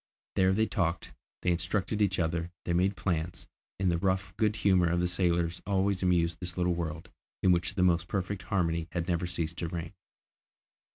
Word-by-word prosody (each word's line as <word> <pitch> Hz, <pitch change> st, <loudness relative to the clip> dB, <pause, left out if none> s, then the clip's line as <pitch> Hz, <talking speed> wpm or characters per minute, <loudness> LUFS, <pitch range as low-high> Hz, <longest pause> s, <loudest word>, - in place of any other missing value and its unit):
There 95 Hz, 0 st, +4 dB
they 110 Hz, +3 st, +3 dB
talked, 90 Hz, -5 st, -1 dB, 0.3 s
they 90 Hz, -, +3 dB
instructed 95 Hz, +4 st, 0 dB
each 95 Hz, -2 st, +2 dB
other, 85 Hz, 0 st, -1 dB, 0.2 s
they 85 Hz, -, 0 dB
made 95 Hz, +3 st, +2 dB
plans, 85 Hz, -3 st, -2 dB, 0.3 s
and 95 Hz, -1 st, +2 dB
the 85 Hz, -, 0 dB
rough 95 Hz, +1 st, 0 dB
good 105 Hz, -1 st, +1 dB
humour 95 Hz, -5 st, +3 dB
of 85 Hz, +1 st, +1 dB
the 90 Hz, -, +2 dB
sailor 85 Hz, -1 st, +2 dB, 0.2 s
always 100 Hz, -1 st, +1 dB
amused 85 Hz, -2 st, +2 dB
this 90 Hz, -1 st, -4 dB
little 90 Hz, 0 st, +2 dB
world, 85 Hz, 0 st, -4 dB, 0.3 s
in 95 Hz, -, +6 dB
which 90 Hz, +2 st, +1 dB
the 95 Hz, -, +2 dB
most 85 Hz, -2 st, +3 dB
perfect 95 Hz, 0 st, -2 dB
harmony 85 Hz, -4 st, 0 dB
had 85 Hz, -1 st, -2 dB
never 90 Hz, -1 st, 0 dB
ceased 85 Hz, -1 st, -3 dB
to 85 Hz, -, -2 dB
reign. 85 Hz, +1 st, -5 dB
90 Hz, 185 wpm, -30 LUFS, 85-95 Hz, 0.3 s, in